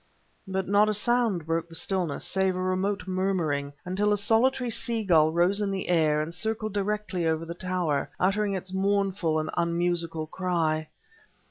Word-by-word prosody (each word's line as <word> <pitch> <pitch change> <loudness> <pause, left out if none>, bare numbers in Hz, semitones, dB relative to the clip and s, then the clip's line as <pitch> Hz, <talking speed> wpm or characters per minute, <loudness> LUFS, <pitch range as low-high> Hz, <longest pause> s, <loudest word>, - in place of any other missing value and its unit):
But 190 0 -2
not 205 +2 +4
a 215 - +2
sound 225 -6 +1
broke 165 +1 -1
the 165 - -9
stillness 180 -5 -1
save 190 -1 +1
a - - -3
remote 185 +2 -1
murmuring, 180 -7 -1
until 195 +3 +1
a 205 - +3
solitary 240 +4 +2
sea 230 0 -1
gull 160 -5 +4
rose 175 +5 +2
in 205 - 0
the 195 -2 -3
air 155 -3 +3
and 165 +2 -6
circled 215 +3 -2
directly 205 -3 -1
over 160 0 0
the 170 - -5
tower, 175 -6 -1
uttering 200 +2 +1
its 185 0 -6
mournful 195 -4 +1
and 155 0 -2
unmusical 170 -1 0
cry. 160 -3 -1
185 Hz, 165 wpm, -27 LUFS, 165-200 Hz, -, not